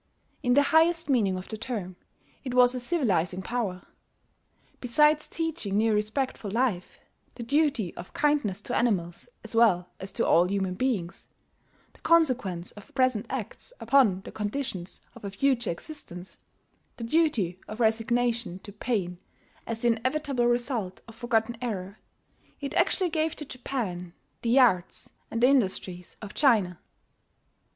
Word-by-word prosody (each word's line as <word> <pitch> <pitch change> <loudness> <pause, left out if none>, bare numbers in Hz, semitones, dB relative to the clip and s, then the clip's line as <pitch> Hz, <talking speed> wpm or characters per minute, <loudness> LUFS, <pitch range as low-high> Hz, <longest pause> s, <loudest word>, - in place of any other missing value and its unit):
In 245 0 +2
the 285 - +6
highest 330 0 +4
meaning 200 -8 +2
of 185 - -7
the 220 - -6
term, 215 -7 -4 0.5
it 255 -2 -4
was 250 0 +6
a 255 - -3
civilizing 190 - 0
power. 200 -6 -3 1.0
Besides 300 +5 +3
teaching 325 -12 -2
new 220 +1 +3
respect 215 +6 -1
for 205 - -5
life, 220 -4 -1 0.4
the 240 - -6
duty 275 - +1
of 175 - -9
kindness 285 -10 +1
to 245 - -4
animals 190 -3 0
as 225 - -9
well 185 -6 +3
as 190 +1 -7
to - - 0
all 175 +2 +5
human 190 -2 -1
beings, 195 -5 -2 0.7
the - - -22
consequence 255 - +2
of 205 - -14
present 255 -5 +2
acts - - -6
upon 230 -6 +4
the - - -10
conditions 205 -4 -4
of - - -14
a 200 - -3
future 240 +3 +1
existence, 180 - -8 0.6
the 235 - -6
duty 230 - +1
of 215 +2 -7
resignation 230 -2 +1
to 205 - -9
pain 195 -5 -2 0.5
as 230 0 -4
the 240 - +4
inevitable 255 +2 0
result 240 -6 -1
of 225 - -11
forgotten 235 0 0
error, 200 -4 -4 0.6
it 280 -1 -5
actually 355 0 +2
gave 315 0 0
to 300 - -7
Japan 220 -10 -4 0.3
the 235 +2 +2
arts 185 -9 +2 0.2
and 230 +1 -2
the - - +8
industries 190 -8 0
of 205 0 -7
China. 210 - +3
230 Hz, 145 wpm, -27 LUFS, 190-260 Hz, 1.0 s, the